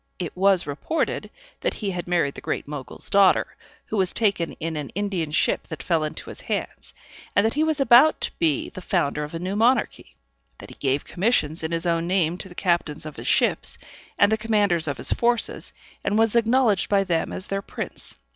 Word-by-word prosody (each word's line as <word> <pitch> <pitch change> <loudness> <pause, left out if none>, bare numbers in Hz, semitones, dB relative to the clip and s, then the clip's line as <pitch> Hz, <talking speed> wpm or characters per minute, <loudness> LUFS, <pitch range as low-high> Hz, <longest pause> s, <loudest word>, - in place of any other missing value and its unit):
It 175 -4 -5
was 190 -1 +3
reported 145 - -2 0.3
that - - -1
he 205 -3 -3
had 175 -2 -5
married 170 -6 +1
the - - -9
Great - - -3
Mogul's 145 -3 -6
daughter, 200 -2 +3 0.3
who 220 - -4
was 185 -2 +1
taken 200 -7 +1
in 165 0 -5
an 150 -3 -4
Indian 195 -6 -2
ship 150 - +1
that 160 - -7
fell 165 -3 +1
into 155 - -5
his - - -9
hands, - - -5 0.4
and 200 - +4
that 225 - +1
he 300 - +1
was 315 -2 0
about 270 +4 +6
to - - -1
be 155 -4 +1
the 185 - -9
founder 150 -5 0
of 150 +2 -7
a - - -3
new 185 +3 -3
monarchy 240 +5 +1 0.4
that - - -11
he - - -12
gave 135 0 0
commissions 175 -6 0
in 160 - -2
his 165 0 -1
own 170 0 0
name 180 -2 +1
to 190 - -7
the 175 - -13
captains 170 -5 -1
of 155 - -8
his - - -7
ships, - - +3 0.4
and 200 +2 +4
the 220 - +3
commanders 205 -7 +1
of 140 -2 -2
his - - +3
forces, 240 0 0 0.3
and 205 +1 0
was 225 0 +3
acknowledged 230 -3 +3
by 200 -1 +3
them 170 -4 -1
as 190 - -4
their 195 0 -3
prince. - - -7
185 Hz, 210 wpm, -24 LUFS, 160-210 Hz, 0.4 s, about